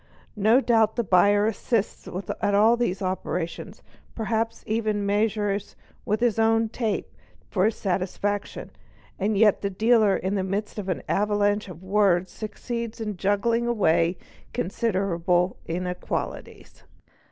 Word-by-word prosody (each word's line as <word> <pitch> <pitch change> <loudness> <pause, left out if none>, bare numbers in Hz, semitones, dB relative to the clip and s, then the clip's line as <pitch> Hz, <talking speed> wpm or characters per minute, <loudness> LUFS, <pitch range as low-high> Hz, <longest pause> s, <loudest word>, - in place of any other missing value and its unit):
No 225 +6 +5
doubt 225 -4 +3
the 235 - 0
buyer 205 +2 +4
assists 220 0 -1 0.3
at 200 - +2
all 220 +3 +5
these 200 -5 -1
operations, 180 -2 -4 0.3
perhaps 225 +1 -2
even 215 -2 -1
measures 205 -1 0 0.3
with 210 +2 0
his 235 -3 +2
own 225 0 +3
tape 220 -2 -3 0.4
for 185 -1 +2
his 220 0 +1
own - - -18
satisfaction, 200 +3 -3 0.5
and 205 +1 0
yet 210 -1 +4
the 200 - -1
dealer 215 0 +3
in 190 +1 -2
the 195 -2 0
midst 205 +3 -3
of 195 -2 -5
an 185 - -2
avalanche 205 0 +1
of 175 0 -11
words 190 -2 +2
succeeds 230 +2 -5
in 210 -2 -3
juggling 205 +5 +1
away 175 -6 +2 0.4
consider 195 -1 -1
ible 180 +1 +1
inequalities. 180 +2 -5
205 Hz, 135 wpm, -25 LUFS, 190-225 Hz, 0.5 s, No